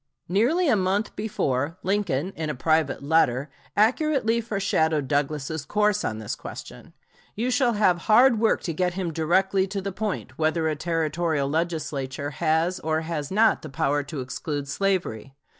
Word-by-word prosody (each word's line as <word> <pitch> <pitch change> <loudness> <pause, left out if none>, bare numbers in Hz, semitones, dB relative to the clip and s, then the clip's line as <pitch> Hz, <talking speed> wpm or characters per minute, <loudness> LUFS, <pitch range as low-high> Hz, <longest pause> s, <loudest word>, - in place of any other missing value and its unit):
Nearly 250 - +2
a 250 - +4
month 195 +2 0
before, 160 -7 -1
Lincoln 190 -4 0
in 160 -1 -3
a 150 - -2
private 155 0 +1
letter 140 -3 +2 0.3
accurately 235 +1 +2
foreshadowed 160 - 0
Douglas's 145 +2 -1
course 210 +5 +1
on 110 - -2
this 110 -2 -4
question. - - -10 0.4
"You 240 +4 -1
shall 250 -2 +2
have 190 -5 +3
hard 235 +1 +6
work 225 0 +2
to 165 - -2
get 180 +2 -1
him 180 -4 -3
directly 190 +4 +2
to 195 +1 -3
the 195 +1 -4
point 185 -9 -4
whether 160 +1 +1
a 155 - 0
Territorial 160 -2 -1
Legislature 145 -3 -2
has 160 +4 0
or 160 0 -1
has 160 -3 -4
not 215 +3 +3
the - - -8
power 140 +2 0
to 145 -1 -6
exclude 140 +3 -4
slavery. 140 - -2
165 Hz, 160 wpm, -25 LUFS, 145-200 Hz, 0.4 s, hard